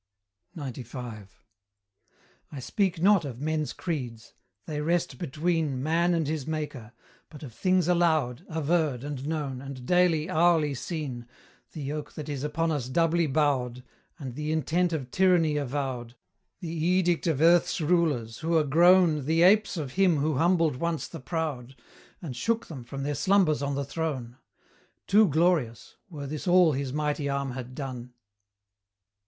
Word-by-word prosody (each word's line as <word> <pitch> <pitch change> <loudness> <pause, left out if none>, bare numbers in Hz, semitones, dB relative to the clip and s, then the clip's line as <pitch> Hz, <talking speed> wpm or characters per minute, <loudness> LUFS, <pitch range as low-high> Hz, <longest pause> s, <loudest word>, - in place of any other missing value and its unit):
XCV. 125 -6 -7 1.2
I 145 - -7
speak 190 - -1
not 200 -2 +5
of 130 -5 -6
men's 155 +1 -1
creeds 125 -10 -5 0.3
they 150 -1 -4
rest 170 +3 -1
between 160 -4 -1
Man 170 +3 +2
and 165 -2 0
his 150 -2 -3
Maker 150 -7 -5 0.4
but 150 -1 -12
of 125 -6 -9
things 185 - +1
allowed, 160 -8 +1
Averred, 155 -4 0
and 145 -1 -5
known, 145 -5 -3
and 135 -2 -8
daily, 175 -2 +3
hourly 165 -4 +3
seen 135 -5 -5 0.5
The 155 - -6
yoke 145 +1 -5
that 155 -1 -7
is 140 -2 -4
upon 160 +2 -1
us 135 -5 -2
doubly 165 +3 +2
bowed, 130 -4 0 0.3
And 135 -6 -7
the 150 +4 -3
intent 165 +3 +1
of 135 -6 -4
tyranny 175 -5 +3
avowed, 130 -4 -3 0.5
The 165 -2 -5
edict 175 +1 +1
of 155 -5 +1
Earth's 170 +2 +4
rulers, 150 -9 0
who 165 +1 +1
are 155 - +3
grown 165 0 +4
The 165 +3 +3
apes 195 -1 +4
of 145 -5 -4
him 180 +1 +3
who 145 0 0
humbled 165 -3 +2
once 170 +2 -2
the 165 - -9
proud, 135 -4 -4 0.5
And 140 -7 -5
shook 225 - -1
them 135 -7 -8
from 135 +4 -6
their 145 +1 -1
slumbers 185 -3 +2
on 140 0 -1
the 140 0 -2
throne; 135 -5 -4 0.7
Too 210 +1 +5
glorious, 155 -7 0
were 150 -5 -7
this 150 +5 -6
all 180 -2 +5
his 135 -1 -3
mighty 150 0 -1
arm 140 -1 -2
had 130 0 -7
done. 125 -3 -6
150 Hz, 155 wpm, -27 LUFS, 135-170 Hz, 1.2 s, not